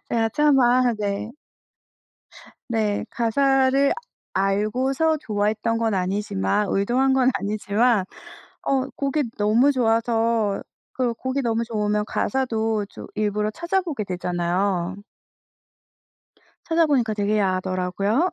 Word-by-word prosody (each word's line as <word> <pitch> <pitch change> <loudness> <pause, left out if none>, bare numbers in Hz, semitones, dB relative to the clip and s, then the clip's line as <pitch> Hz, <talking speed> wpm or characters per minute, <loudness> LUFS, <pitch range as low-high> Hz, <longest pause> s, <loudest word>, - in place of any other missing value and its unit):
제가 225 -1 +1
차마 255 -4 +4
네. 205 +2 -2 1.4
네. 215 -3 -1
가사를 270 +3 +2 0.4
알고서 250 +11 +1
좋아했던 220 -3 -1
건 225 -1 0
아니지만, 190 - 0
의도한 250 +7 +2
건 260 -1 +4
아니지만 205 +2 +1 0.6
어 265 -1 +1
곡이 280 +2 0
너무 220 +7 +4
좋아서 225 -3 +1 0.3
그리고 250 -2 0
곡이 260 +3 -2
너무 230 -2 0
좋으면 210 -2 -1
가사도 225 -5 -1
좀 - - -11
일부러 210 0 0
찾아보게 340 - -2
되잖아요. 180 0 -1 1.7
찾아보니까 295 -9 +2
되게 210 0 0
야하더라고요. 190 - 0
225 Hz, 245 characters per minute, -23 LUFS, 205-260 Hz, 1.7 s, 차마